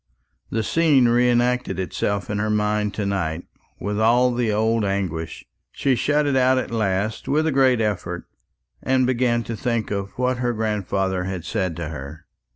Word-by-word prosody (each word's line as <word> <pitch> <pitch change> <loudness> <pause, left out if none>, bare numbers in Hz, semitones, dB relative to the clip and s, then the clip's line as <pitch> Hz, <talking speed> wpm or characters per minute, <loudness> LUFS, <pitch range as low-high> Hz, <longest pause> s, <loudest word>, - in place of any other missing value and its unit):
The 110 - -1
scene 145 -2 +3
re 120 +1 +3
acted 120 -4 +1
itself 100 +1 -2
in 105 - -1
her 110 +1 0
mind 105 0 +1
to 105 - -2
night, 90 -4 -2 0.4
with 105 +1 -2
all 120 +3 +4
the 120 -2 0
old 110 +1 +1
anguish. 95 -5 -3 0.3
She 135 - +1
shut 150 +4 +1
it 140 -2 +1
out 130 0 +4
at 130 - -2
last 105 -1 -1
with 155 +3 +2
a 160 - +1
great 130 -3 +3
effort, 95 -5 -2 0.6
and 130 -1 +2
began 120 -2 +1
to 115 - -5
think 115 -1 -2
of 100 -1 -2
what 125 0 +1
her 120 0 0
grandfather 100 -4 -1
had 95 -3 -4
said 95 -6 -2
to 85 -2 -5
her. 75 +2 -8
110 Hz, 175 wpm, -22 LUFS, 95-125 Hz, 0.6 s, all